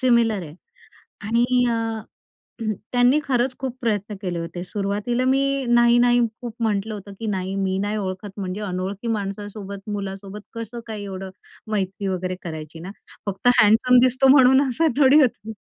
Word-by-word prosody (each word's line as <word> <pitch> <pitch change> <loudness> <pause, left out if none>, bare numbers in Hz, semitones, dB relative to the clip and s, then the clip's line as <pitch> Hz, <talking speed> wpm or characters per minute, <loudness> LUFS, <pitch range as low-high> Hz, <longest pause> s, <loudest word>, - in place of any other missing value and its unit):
Similar 235 -5 +3
आहे. 155 -3 -9 0.7
आणि 230 +3 +1 0.3
अ, 225 -1 -2 0.9
त्यांनी 245 +3 +4
खरंच 255 -1 0
खूप 260 -2 -4
प्रयत्न 210 -3 -1
केले 180 -2 -2
होते. 170 +1 -5
सुरुवातीला 205 +6 -2
मी 265 +1 +3 0.3
नाही-नाही 240 0 +5 0.2
खूप 240 -2 -6
म्हटलं 215 0 0
होतं, 200 -1 -9
की 225 - -3
नाही, 190 -2 -2
मी 190 -1 0
नाही 205 +2 -1
ओळखत, 190 0 -4
म्हणजे 190 +1 -4
अनोळखी 190 +3 -4
माणसासोबत, 200 -1 -5
मुलासोबत 195 0 -6
कसं 230 +1 -6
काही 215 -2 -6
एवढं 190 -1 -6 0.4
मैत्री 195 0 -2
वगैरे 185 0 -2
करायची 160 -2 -7
ना? 180 +3 -7 0.4
फक्त 200 +4 0
हँडसम 225 +4 +6
दिसतो 255 +1 +3
म्हणून 265 +1 +6
असं 320 +6 +2
थोडी 285 +2 +7
होतं. 225 -4 0
210 Hz, 150 wpm, -23 LUFS, 195-240 Hz, 0.9 s, थोडी